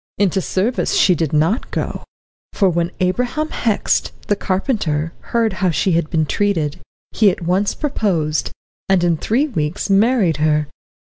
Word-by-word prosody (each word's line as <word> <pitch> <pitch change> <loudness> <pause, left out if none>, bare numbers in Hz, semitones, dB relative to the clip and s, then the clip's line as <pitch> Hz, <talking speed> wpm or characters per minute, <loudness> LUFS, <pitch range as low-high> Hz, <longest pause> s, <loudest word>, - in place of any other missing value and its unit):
Into 190 -1 +1
service 210 +8 -1
she 185 - +5
did 160 -3 -1
not 160 - +1
go, - - -4 0.5
for 195 - +3
when 170 0 0
Abraham 245 +11 0
Hext, 220 -3 0 0.2
the 205 - +1
carpenter, 185 - -1 0.2
heard 230 -3 +1
how 185 - +3
she 170 +4 +1
had 165 -2 +1
been 160 -1 +1
treated, 165 -5 -1 0.3
he 215 -2 +4
at 180 - -4
once 185 +4 +1
proposed, 175 - -1 0.4
and 190 -2 +3
in 170 -1 +3
three 240 - 0
weeks 170 - -2
married 200 - +3
her. 150 -1 +1
185 Hz, 150 wpm, -19 LUFS, 160-210 Hz, 0.5 s, she